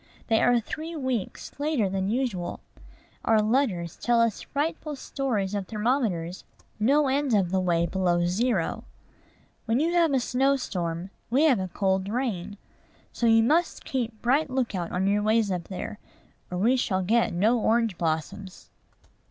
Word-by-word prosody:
They 225 -1 +3
are 245 0 +4
three 315 +8 -6
weeks 260 -8 -3
later 290 -8 +1
than 190 0 -1
usual. 225 -7 -2 0.6
Our 225 -1 +4
letters 215 - 0
tell 240 -1 +2
us 230 -3 +1
frightful 300 +1 -3
stories 240 -8 -2
of 200 -2 -3
thermometers 210 -6 -1 0.4
no 280 +7 +3
end 270 -2 +1
of 185 -4 +1
the 190 - +2
way 170 -2 +1
below 175 -1 +1
zero. 195 0 0 0.8
When 230 +2 +1
you 330 +3 +1
have 340 -3 +3
a 270 - +3
snow 265 +3 +2
storm, 175 -7 -4 0.2
we 265 +6 +3
have 275 -9 +4
a 185 - -2
cold 190 +1 0
rain: 210 -5 -3 0.6
so 235 - 0
you 225 0 +5
must 325 +8 +1
keep 235 -4 -3
bright 275 +5 +2
lookout 230 -10 -2
on 185 +1 0
your 205 +1 +2
ways 215 -1 +2
up 180 -2 -3
there, 200 +2 -6 0.5
or 180 - -4
we 235 +8 +3
shall 190 -6 0
get 230 +5 +2
no 215 +8 +2
orange 225 -2 +1
blossoms. 170 +4 -4
220 Hz, 160 wpm, -26 LUFS, 190-260 Hz, 0.8 s, you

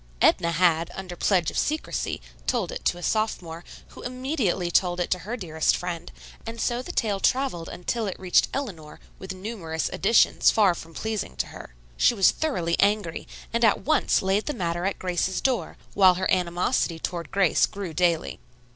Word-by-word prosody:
Edna 170 - +4
had, 170 -1 +3
under 185 -2 -6
pledge 175 -3 +2
of - - -1
secrecy, 310 +1 -2 0.3
told 230 -9 0
it - - -6
to 175 - +2
a 175 - -9
sophomore, 175 -7 -1 0.3
who - - -12
immediately 250 - -1
told 175 0 +2
it 175 - -2
to 180 - +2
her 215 +8 -5
dearest 160 -6 +1
friend, 175 -1 -5 0.3
and 230 0 -7
so 240 +2 0
the 355 - -7
tale 210 - 0
traveled 250 -9 0
until 220 +5 -3
it 190 - -5
reached 185 -1 +3
Eleanor, 185 - -6 0.2
with 190 0 -6
numerous 185 -5 -4
additions, 220 +4 +4
far 205 -5 +4
from 165 -1 -11
pleasing 220 -2 -3
to - - -1
her. - - -11 0.2
She 240 - +4
was 195 -3 +5
thoroughly 175 - -1
angry, 200 -4 +1 0.3
and 235 +1 +1
at 220 -3 +4
once 310 -8 +2
laid 195 +2 +1
the 295 - -2
matter 175 0 -2
at 195 - -1
Grace's 185 +1 -1
door, 260 -3 -1 0.2
while 185 -2 +6
her 185 +1 -1
animosity 175 0 +1
toward 170 0 -4
Grace 195 -4 +3
grew 195 -5 -6
daily. 170 -1 +1
185 Hz, 180 wpm, -25 LUFS, 170-220 Hz, 0.3 s, while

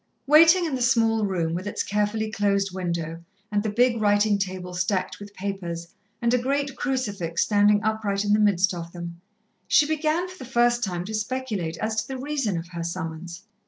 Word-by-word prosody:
Waiting 330 +5 +7
in 315 - -2
the 255 - -2
small 225 -3 +3
room, 170 -4 -1
with 185 +4 -4
its - - -2
carefully 210 +1 -1
closed 200 -2 +1
window, 170 -3 -3 0.3
and 205 -1 +1
the 215 - -2
big 235 +1 +2
writing 205 0 +3
table 185 -2 -4
stacked 185 +1 -1
with 205 0 -11
papers, 175 -4 -5 0.3
and 235 +1 +3
a 250 - +4
great 275 +2 -1
crucifix 205 - -1
standing 205 0 +3
upright 210 -2 0
in 205 - +3
the 210 - +4
midst 200 -2 +3
of 170 -1 -7
them, 170 -1 -7 0.5
she 300 - +5
began 315 +3 0
for 370 0 -12
the 260 -2 -9
first 240 0 +3
time 180 -3 -2
to 215 - -6
speculate 215 -6 -3
as 220 0 -2
to 220 - -1
the 265 - -5
reason 270 - -1
of 165 +1 -6
her 170 -2 -5
summons. 170 +1 -5
205 Hz, 195 wpm, -25 LUFS, 180-240 Hz, 0.5 s, Waiting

